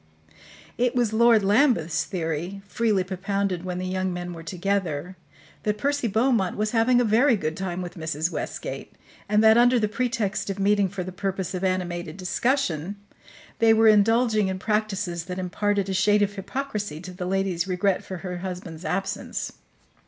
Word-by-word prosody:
It 245 Hz, 0 st, +2 dB
was 240 Hz, -3 st, +1 dB
Lord 230 Hz, -1 st, +5 dB
Lambeth's 195 Hz, -, +3 dB
theory, 175 Hz, +2 st, -4 dB
freely 215 Hz, -3 st, +1 dB
propounded 195 Hz, -1 st, -2 dB
when 180 Hz, -1 st, -4 dB
the 185 Hz, -, -3 dB
young 185 Hz, 0 st, -1 dB
men 175 Hz, 0 st, -5 dB
were 165 Hz, -, -8 dB
together, 180 Hz, -2 st, -2 dB, 0.5 s
that 210 Hz, 0 st, -1 dB
Percy 285 Hz, +2 st, 0 dB
Beaumont 220 Hz, -3 st, +1 dB
was 215 Hz, 0 st, 0 dB
having 240 Hz, +2 st, +3 dB
a -, -, +3 dB
very 235 Hz, +4 st, +4 dB
good 155 Hz, -6 st, -2 dB
time 185 Hz, -1 st, -3 dB
with 175 Hz, -1 st, -7 dB
Mrs. 160 Hz, 0 st, -2 dB
Westgate, -, -, -5 dB, 0.4 s
and 210 Hz, +1 st, +4 dB
that, 220 Hz, +1 st, +7 dB
under 245 Hz, +1 st, +5 dB
the 215 Hz, -, +1 dB
pretext 225 Hz, -3 st, -1 dB
of 195 Hz, -, -3 dB
meeting 200 Hz, 0 st, +2 dB
for 195 Hz, -1 st, -4 dB
the 185 Hz, -, -6 dB
purpose 190 Hz, -1 st, -3 dB
of 185 Hz, 0 st, -3 dB
animated 180 Hz, -1 st, -2 dB
discussion, 190 Hz, -, 0 dB, 0.6 s
they 225 Hz, -1 st, +5 dB
were 225 Hz, 0 st, +5 dB
indulging 215 Hz, 0 st, +4 dB
in 190 Hz, 0 st, -2 dB
practices 200 Hz, -5 st, -1 dB
that 180 Hz, 0 st, -5 dB
imparted 200 Hz, +2 st, 0 dB
a 190 Hz, -, -2 dB
shade 205 Hz, +2 st, +3 dB
of 205 Hz, 0 st, -1 dB
hypocrisy 210 Hz, -, -4 dB
to 180 Hz, 0 st, -8 dB
the 180 Hz, 0 st, -5 dB
lady's 190 Hz, -2 st, 0 dB
regret 185 Hz, +1 st, +1 dB
for 185 Hz, -, -6 dB
her 180 Hz, -1 st, -4 dB
husband's 180 Hz, -3 st, -6 dB
absence. 195 Hz, +2 st, -3 dB
195 Hz, 170 wpm, -25 LUFS, 180-215 Hz, 0.6 s, that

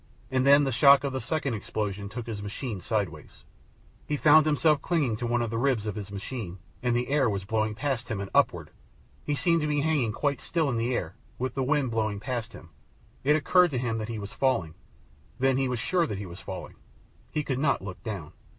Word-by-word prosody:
And 130 Hz, +1 st, +2 dB
then 140 Hz, +1 st, +7 dB
the 135 Hz, -, 0 dB
shock 140 Hz, +3 st, +6 dB
of 140 Hz, -1 st, -2 dB
the 130 Hz, -, -2 dB
second 140 Hz, +1 st, -1 dB
explosion 100 Hz, -2 st, -3 dB
took 115 Hz, +2 st, -6 dB
his 110 Hz, -3 st, -5 dB
machine 105 Hz, 0 st, -5 dB
sideways. 95 Hz, -9 st, -3 dB, 0.6 s
He 150 Hz, -, 0 dB
found 155 Hz, +1 st, +6 dB
himself 150 Hz, 0 st, +3 dB
clinging 150 Hz, -10 st, +1 dB
to 120 Hz, -, -3 dB
one 120 Hz, 0 st, +1 dB
of 115 Hz, -, -3 dB
the 115 Hz, -, -1 dB
ribs 125 Hz, -4 st, +1 dB
of 105 Hz, -, -2 dB
his 100 Hz, -1 st, -7 dB
machine, 100 Hz, -2 st, -5 dB, 0.2 s
and 125 Hz, -1 st, +1 dB
the 120 Hz, +2 st, -1 dB
air 140 Hz, -4 st, +3 dB
was 100 Hz, -2 st, -3 dB
blowing 110 Hz, +1 st, 0 dB
past 130 Hz, -1 st, -2 dB
him 110 Hz, -4 st, -2 dB
and 100 Hz, -1 st, -5 dB
upward. -, -, +2 dB, 0.5 s
He 145 Hz, -, -1 dB
seemed 170 Hz, +2 st, +2 dB
to 150 Hz, -, 0 dB
be 145 Hz, -1 st, +1 dB
hanging 145 Hz, -7 st, +1 dB
quite 140 Hz, +4 st, -1 dB
still 160 Hz, -5 st, 0 dB
in 120 Hz, -, -1 dB
the 120 Hz, +2 st, 0 dB
air, 85 Hz, -4 st, -3 dB, 0.2 s
with 130 Hz, 0 st, -2 dB
the 135 Hz, -, -2 dB
wind 135 Hz, -1 st, +1 dB
blowing 110 Hz, -2 st, 0 dB
up 100 Hz, -, -11 dB
past 120 Hz, -3 st, -3 dB
him. 80 Hz, -, -12 dB, 0.5 s
It 150 Hz, +3 st, +4 dB
occurred 180 Hz, +4 st, +4 dB
to 135 Hz, -, -2 dB
him 115 Hz, -2 st, -1 dB
that 110 Hz, +1 st, -4 dB
he 115 Hz, -, -3 dB
was 100 Hz, -1 st, -7 dB
falling. 95 Hz, -, +1 dB, 0.6 s
Then 130 Hz, 0 st, +2 dB
he 135 Hz, -1 st, +1 dB
was 125 Hz, -1 st, -1 dB
sure 175 Hz, +8 st, +1 dB
that 105 Hz, -, -4 dB
he 100 Hz, -, -5 dB
was 90 Hz, 0 st, -9 dB
falling. -, -, -8 dB, 0.5 s
He 150 Hz, -, -2 dB
could 130 Hz, -2 st, -2 dB
not 140 Hz, -8 st, +1 dB
look 95 Hz, -2 st, -7 dB
down. 95 Hz, -9 st, -5 dB
120 Hz, 230 wpm, -27 LUFS, 105-140 Hz, 0.6 s, then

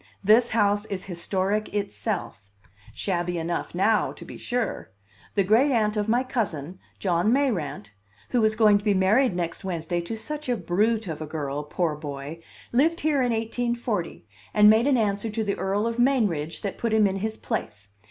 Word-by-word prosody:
This 225 Hz, +4 st, +5 dB
house 205 Hz, -1 st, +2 dB
is 195 Hz, -3 st, -5 dB
historic 190 Hz, +3 st, -1 dB
itself. 200 Hz, -, -3 dB, 0.4 s
Shabby 175 Hz, -2 st, -2 dB
enough 170 Hz, +1 st, -3 dB
now, 210 Hz, +4 st, +2 dB
to -, -, -11 dB
be -, -, -9 dB
sure! 245 Hz, -1 st, -3 dB, 0.5 s
The 200 Hz, -, +3 dB
great 225 Hz, +9 st, +4 dB
aunt 220 Hz, -5 st, +1 dB
of 210 Hz, 0 st, -1 dB
my 240 Hz, +3 st, +3 dB
cousin, 190 Hz, -, -3 dB, 0.2 s
John 180 Hz, +2 st, +1 dB
Mayrant 205 Hz, -, 0 dB, 0.4 s
(who 240 Hz, -3 st, +2 dB
is 215 Hz, 0 st, +3 dB
going 210 Hz, -2 st, +5 dB
to -, -, -12 dB
be 205 Hz, -2 st, +2 dB
married 200 Hz, +4 st, +3 dB
next 170 Hz, +1 st, -3 dB
Wednesday, 175 Hz, -2 st, -2 dB
to 195 Hz, +7 st, -5 dB
such 300 Hz, +4 st, -5 dB
a 245 Hz, -, +1 dB
brute 210 Hz, +5 st, 0 dB
of 160 Hz, -2 st, -5 dB
a 155 Hz, -, -4 dB
girl, 145 Hz, -2 st, -3 dB
poor 155 Hz, +1 st, -1 dB
boy!), 145 Hz, +1 st, -7 dB, 0.3 s
lived 315 Hz, +7 st, +2 dB
here 295 Hz, -3 st, +2 dB
in 245 Hz, -1 st, +1 dB
1840, 230 Hz, -, -2 dB, 0.3 s
and 210 Hz, 0 st, +8 dB
made 225 Hz, +4 st, +3 dB
an 275 Hz, -3 st, +4 dB
answer 210 Hz, 0 st, 0 dB
to 220 Hz, +1 st, -2 dB
the 200 Hz, -1 st, 0 dB
Earl 200 Hz, +3 st, -1 dB
of 230 Hz, +1 st, -2 dB
Mainridge 210 Hz, -, +1 dB
that 200 Hz, -, -4 dB
put 230 Hz, -2 st, -1 dB
him 220 Hz, -1 st, +5 dB
in 195 Hz, -1 st, 0 dB
his 220 Hz, +2 st, -3 dB
place. 105 Hz, -, -4 dB
205 Hz, 180 wpm, -25 LUFS, 175-230 Hz, 0.5 s, and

